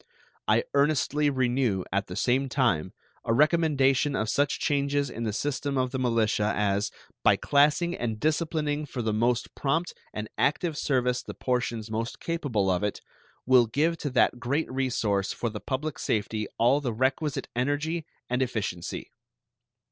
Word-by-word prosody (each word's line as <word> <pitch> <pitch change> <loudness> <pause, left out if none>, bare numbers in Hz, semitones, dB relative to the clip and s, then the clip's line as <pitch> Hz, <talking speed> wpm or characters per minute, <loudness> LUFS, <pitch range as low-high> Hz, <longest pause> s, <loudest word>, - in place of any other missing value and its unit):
I - - +4
earnestly 145 +1 +2
renew, 125 -7 +1
at 100 0 0
the 90 - -6
same 130 +5 +1
time, 100 - +1 0.3
a 115 - +1
recommendation 145 -2 +3
of 110 -2 -1
such 145 0 +1
changes 140 -2 0
in 115 +1 -4
the 110 - 0
system 140 +4 -2
of 130 -1 0
the 130 - -2
militia 110 -4 +1
as, 100 0 +1 0.3
by - - +6
classing 150 +5 +3
and 110 -3 -3
disciplining 155 -1 0
for 125 -3 -4
the 110 -1 0
most 120 +2 0
prompt 160 +5 -1 0.2
and 105 0 -5
active 150 +3 +1
service 125 -3 +1
the - - -9
portions 120 -3 -2
most 115 +1 -3
capable 140 -12 -1
of 90 0 0
it, 105 - -2 0.4
will 125 -2 +5
give 150 +9 +1
to 145 - -3
that 125 -1 +2
great 140 +6 -1
resource 115 -7 0
for 120 - -3
the 105 -2 -6
public 140 +7 -3
safety 105 0 -1
all 125 +5 +4
the 125 -5 -2
requisite 135 +4 0
energy 145 +6 -1 0.2
and 125 +1 0
efficiency. 105 -9 -3
130 Hz, 155 wpm, -27 LUFS, 115-145 Hz, 0.4 s, by